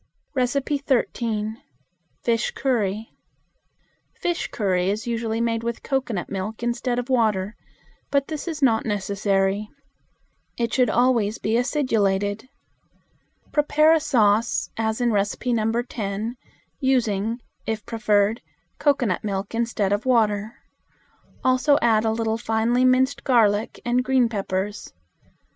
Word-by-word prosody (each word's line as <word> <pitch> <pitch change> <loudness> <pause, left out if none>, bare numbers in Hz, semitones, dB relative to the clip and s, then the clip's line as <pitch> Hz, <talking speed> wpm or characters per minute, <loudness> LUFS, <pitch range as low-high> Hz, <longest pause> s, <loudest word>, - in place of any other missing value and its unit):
13. 245 -4 -1 0.6
Fish 230 -1 +1
Curry. 220 -5 -1 1.0
Fish 345 -1 -2
curry 185 -3 0
is 210 +2 -2
usually 230 -1 -2
made 230 -1 0
with 235 0 -4
cocoanut 250 -9 -2
milk 205 +4 -5
instead 240 +1 -1
of 245 0 -2
water, 215 -5 +1 0.5
but 280 -1 +1
this 310 +1 -5
is 310 -4 -3
not 225 -4 +4
necessary. 200 0 0 0.9
It 235 -1 -1
should 250 -3 +3
always 235 -3 +2
be 220 +2 -1
acidulated. 220 -4 0 1.0
Prepare 305 +1 +4
a 325 - +4
sauce, 230 -6 +2
as 220 +1 -1
in 240 - +3
No. 225 +3 0
10, 215 0 -4 0.4
using, 230 -4 +1 0.3
if 220 -1 -3
preferred, 215 -1 +1 0.4
cocoanut 265 - +1
milk 200 0 -3
instead 225 -4 0
of 205 +5 -2
water. 215 -3 +1 0.9
Also 260 +3 +4
add 225 -2 +3
a 220 - +2
little 225 0 -1
finely 230 +3 +1
minced 260 +2 +3
garlic 220 -4 +2
and 245 +1 +2
green 255 -2 +3
peppers. 200 -1 -3
230 Hz, 115 wpm, -23 LUFS, 210-250 Hz, 1.0 s, not